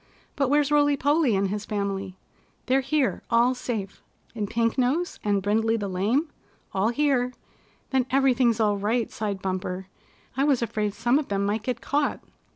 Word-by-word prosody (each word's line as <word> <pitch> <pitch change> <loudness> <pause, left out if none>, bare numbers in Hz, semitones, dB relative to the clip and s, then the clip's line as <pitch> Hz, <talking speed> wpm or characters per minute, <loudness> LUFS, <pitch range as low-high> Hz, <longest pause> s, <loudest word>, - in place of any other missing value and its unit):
But 275 -3 +1
where's 290 0 +2
Rolly 290 -1 +4
Polly 285 -4 +2
and 195 0 +1
his 205 +1 -3
family?" 195 -3 -3 0.5
"They're 265 +1 +3
here 275 -1 0
all 235 +2 +4
safe." 225 -6 -5 0.3
"And 210 -3 -3
Pink 230 -1 +1
Nose, 280 +8 0
and 200 -2 +1
Brindley 225 +3 +2
the 205 -2 -3
Lame?" 210 - 0 0.5
"All 195 +3 +2
here!" 255 -1 +1 0.6
"Then 260 -2 +1
everything's 255 -4 +3
all 210 -2 +2
right," 220 +3 0
sighed 205 -3 -4
Bumper. 185 0 -3 0.5
"I 270 - +1
was 275 -5 +2
afraid 210 -2 -2
some 240 +6 +2
of 300 - -4
them 200 0 -1
might 205 +2 0
get 240 +1 -3
caught." 290 +1 0
230 Hz, 165 wpm, -25 LUFS, 205-270 Hz, 0.6 s, Rolly